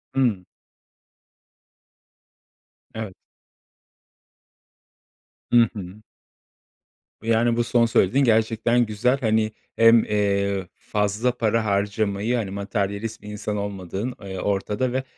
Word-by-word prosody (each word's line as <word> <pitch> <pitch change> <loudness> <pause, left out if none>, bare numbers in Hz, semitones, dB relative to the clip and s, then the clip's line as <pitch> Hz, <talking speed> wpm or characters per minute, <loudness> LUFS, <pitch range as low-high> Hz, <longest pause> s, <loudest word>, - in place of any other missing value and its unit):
Hıı. 115 -9 +1 2.5
Evet. 110 -4 -5 2.4
Hı 120 -1 +6
hı. 100 +1 -8 1.2
Yani, 115 +1 +2
bu 120 - +2
son 120 0 +3
söylediğin 115 +4 +3
gerçekten 115 +1 +2
güzel. 115 +5 +1
Hani, 110 -3 +1 0.2
hem, 115 0 +6
eee, 100 -2 0
fazla 105 +4 0
para 115 -1 +1
harcamayı, 100 +2 0
hani, 110 -5 -2
materyalist 100 +2 -3
bir 105 - -12
insan 105 0 -4
olmadığın, 100 +3 -4
eee, 95 -2 -6
ortada 105 +5 -1
ve, 130 +1 -1
110 Hz, 95 wpm, -23 LUFS, 100-115 Hz, 2.5 s, Hı